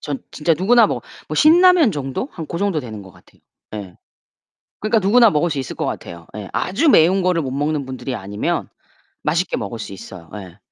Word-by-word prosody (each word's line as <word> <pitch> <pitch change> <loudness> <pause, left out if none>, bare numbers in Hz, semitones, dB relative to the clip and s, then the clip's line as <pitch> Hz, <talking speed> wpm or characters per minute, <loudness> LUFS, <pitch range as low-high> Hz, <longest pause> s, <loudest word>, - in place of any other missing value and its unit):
전 145 -2 -4
진짜 160 +2 +1
누구나 230 +9 +4
뭐 - - -3 0.3
뭐 - - -4
신라면 340 - +6
정도? 140 - -4
한 165 -3 -7
고 170 - -5
정도 195 -6 0
되는 110 -6 -8
것 95 - -14
같아요, - - -23 0.3
예. 95 -4 -8 0.8
그러니까 215 +1 +2
누구나 225 +4 +5
먹을 175 -1 +1
수 145 -3 -2
있을 130 - -5
것 - - -2
같아요. 85 -1 -6
예. 105 -3 -7
아주 235 - +1
매운 185 - +5
거를 180 -2 +1
못 130 -2 -4
먹는 145 +1 -1
분들이 130 0 -5
아니면 100 0 -3 0.5
맛있게 175 +3 0
먹을 110 +2 -5
수 - - -7
있어요. 90 -3 -11
예. 95 -3 -10
150 Hz, 370 characters per minute, -20 LUFS, -, 0.8 s, 신라면